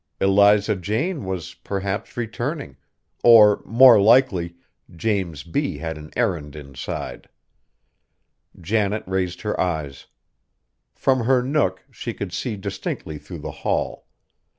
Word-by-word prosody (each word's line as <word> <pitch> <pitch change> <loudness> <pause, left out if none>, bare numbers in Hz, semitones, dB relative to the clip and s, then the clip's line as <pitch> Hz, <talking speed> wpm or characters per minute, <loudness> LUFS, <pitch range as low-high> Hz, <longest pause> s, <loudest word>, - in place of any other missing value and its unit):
Eliza 100 +2 +4
Jane 110 - -2
was, 95 -3 -5
perhaps, 100 +2 -5
returning; 120 - -4 0.5
or 110 -3 +7
more 120 -2 +7
likely 100 -7 +3 0.4
James 90 -6 -2
B. 140 - -2
had 80 0 -4
an 75 0 -10
errand 75 -4 -1
inside. 70 -3 -7 1.3
Janet 105 +3 0
raised 95 -1 -2
her 105 -1 -2
eyes. 75 -7 -3 0.9
From 130 -3 +1
her 130 0 +3
nook 130 -9 0
she - - -6
could 95 -3 -6
see 120 0 -3
distinctly 80 -5 -5
through - - -10
the - - -4
hall. - - -2
100 Hz, 115 wpm, -22 LUFS, 85-115 Hz, 1.3 s, or